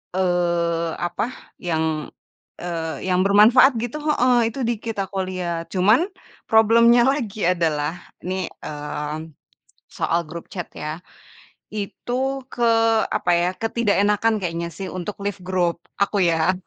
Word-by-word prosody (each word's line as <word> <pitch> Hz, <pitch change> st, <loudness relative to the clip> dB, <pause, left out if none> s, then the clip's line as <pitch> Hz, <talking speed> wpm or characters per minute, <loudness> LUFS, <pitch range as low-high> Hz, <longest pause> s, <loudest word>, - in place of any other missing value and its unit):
eee, 170 Hz, -2 st, +1 dB
apa 175 Hz, +3 st, -2 dB, 0.4 s
yang, 160 Hz, -3 st, -1 dB, 0.5 s
eee, 165 Hz, -2 st, -4 dB
yang 180 Hz, 0 st, +2 dB
bermanfaat 225 Hz, +7 st, +6 dB
gitu 240 Hz, +5 st, -3 dB
heeh, 250 Hz, -6 st, +3 dB
itu 265 Hz, +4 st, -6 dB
dikit 225 Hz, -1 st, -3 dB
aku 195 Hz, +1 st, -8 dB
liat. 170 Hz, -2 st, -3 dB
Cuman 215 Hz, -, +4 dB, 0.4 s
problem-nya 230 Hz, +2 st, +6 dB
lagi 230 Hz, -7 st, -2 dB
adalah 160 Hz, -4 st, +1 dB, 0.3 s
nih, 185 Hz, +1 st, -2 dB, 0.2 s
mmm, 150 Hz, +1 st, -5 dB, 0.5 s
soal 170 Hz, -, 0 dB
grup 170 Hz, +1 st, -7 dB
chat 175 Hz, -3 st, -5 dB
ya. 155 Hz, +2 st, -5 dB, 0.7 s
Itu 255 Hz, +6 st, -3 dB
ke 240 Hz, -, -1 dB, 0.4 s
apa 175 Hz, -, 0 dB
ya, 175 Hz, +1 st, +2 dB
ketidakenakan 220 Hz, -1 st, +1 dB
kayaknya 170 Hz, -1 st, -3 dB
sih 190 Hz, +4 st, -6 dB
untuk 185 Hz, +3 st, -5 dB
left 200 Hz, -2 st, -3 dB
grup 180 Hz, -2 st, 0 dB, 0.2 s
aku 200 Hz, 0 st, +2 dB
ya. 170 Hz, 0 st, +3 dB
185 Hz, 120 wpm, -22 LUFS, 170-225 Hz, 0.7 s, bermanfaat